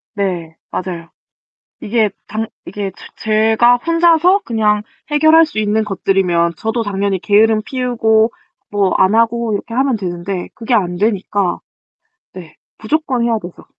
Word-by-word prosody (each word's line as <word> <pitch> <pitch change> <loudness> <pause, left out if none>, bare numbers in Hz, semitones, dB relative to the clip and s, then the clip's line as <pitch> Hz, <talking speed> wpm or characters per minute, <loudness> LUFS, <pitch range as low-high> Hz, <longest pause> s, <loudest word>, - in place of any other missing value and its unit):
네. 175 -5 -3 0.2
맞아요. 170 -3 -5 0.7
이게 215 -1 +1 0.2
당 220 +1 -3 0.2
이게 200 +1 -4 0.3
제 220 0 +1
제가 240 +2 +5
혼자서 335 +5 +3
그냥 210 -2 +1 0.3
해결할 315 +2 +5
수 295 -8 -7
있는 215 +1 +1
것들이면 185 -3 +1
저도 225 +4 -2
당연히 200 -2 -1
게으름 215 +3 +3
피우고 235 -3 +1 0.4
뭐 200 -2 +1
안 190 +3 +3
하고 230 0 +1
이렇게 230 +3 -5
하면 265 0 +1
되는데 180 -1 -4
그게 230 +2 -2
안 180 -5 +1
되니까 200 -1 0 0.7
네, 170 -4 -11 0.2
무조건 260 +1 -1
해야 230 -1 +1
되죠. 175 -4 -11
215 Hz, 280 characters per minute, -16 LUFS, 195-235 Hz, 0.7 s, 제가